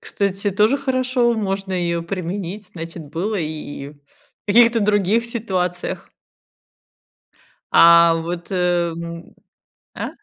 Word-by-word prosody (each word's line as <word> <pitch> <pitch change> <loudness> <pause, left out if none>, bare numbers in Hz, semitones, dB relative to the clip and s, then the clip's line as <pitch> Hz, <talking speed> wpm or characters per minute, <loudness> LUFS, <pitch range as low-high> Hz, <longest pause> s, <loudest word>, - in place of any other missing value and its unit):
кстати, 200 0 -2
тоже 215 +8 +2
хорошо. 255 -3 +1
Можно 195 -2 -3
ее 170 -2 -1
применить, 185 +2 -5
значит, 165 0 -7
было 200 +7 -2
и 150 -4 -5
в 150 - -18 0.5
каких-то 230 +2 +5
других 205 +2 +2
ситуациях. 185 -7 -3 1.6
А 170 0 +7
вот, 170 +1 -5
эм. 170 -2 -1 0.7
А? - - -4
185 Hz, 100 wpm, -20 LUFS, 170-210 Hz, 1.6 s, А